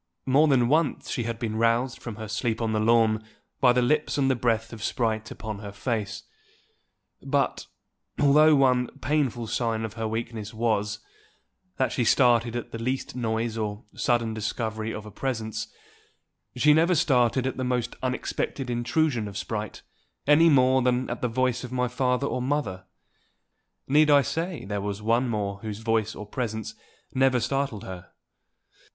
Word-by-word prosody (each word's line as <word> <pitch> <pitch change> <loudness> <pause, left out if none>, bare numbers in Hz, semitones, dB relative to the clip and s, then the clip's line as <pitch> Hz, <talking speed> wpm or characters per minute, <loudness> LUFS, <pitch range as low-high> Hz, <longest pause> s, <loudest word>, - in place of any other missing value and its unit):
More 140 +4 +4
than 130 -4 +3
once 155 +2 +1
she 120 - -2
had 115 -1 -3
been 110 -2 -3
roused 115 +2 +1
from 115 -3 -6
her 110 0 -7
sleep 110 +1 -1
on 110 -2 -1
the 110 - +1
lawn 110 -1 +3 0.4
by 125 - +6
the 125 0 +2
lips 150 +5 +1
and 135 -1 +3
the - - +2
breath 115 -2 0
of 110 - -9
Sprite 110 0 -1
upon 110 -2 -6
her 100 -1 -7
face; 105 0 -3 1.0
but, - - -1 0.5
although 150 +2 +6
one 125 -3 +3
painful 135 -5 0
sign 110 -1 -1
of 110 - -7
her 115 -1 -3
weakness 110 -1 -5
was, 105 -2 0 0.8
that 130 - +1
she 125 - 0
started 120 0 +3
at 120 - -5
the 115 - -6
least 130 +1 -2
noise 115 -1 -2
or 105 0 -3
sudden 115 -2 0
discovery 110 0 -3
of 110 -1 -6
a 105 - -9
presence, 110 -2 -3 0.9
she 150 +4 +5
never 165 +4 +4
started 130 -5 +2
at 130 - -2
the 130 - -2
most 125 -1 -1
unexpected 130 0 -2
intrusion 120 0 0
of 100 -1 -7
Sprite, 105 0 -5 0.4
any 155 +3 +6
more 130 -2 +4
than 125 0 +1
at 120 - -5
the 125 - +1
voice 125 +1 0
of 125 - -7
my 125 -1 0
father 125 +1 0
or 130 - -2
mother. 125 -9 -2 1.0
Need 150 +2 +4
I 145 -1 +6
say 165 - -3
there 100 0 -3
was 100 0 -3
one 120 +3 +2
more 100 -3 -2
whose 105 -1 -5
voice 115 -1 0
or 105 - -7
presence 110 -1 -4 0.4
never 130 -1 +3
startled 135 -3 -2
her? 90 -2 -9
120 Hz, 170 wpm, -26 LUFS, 110-130 Hz, 1.0 s, by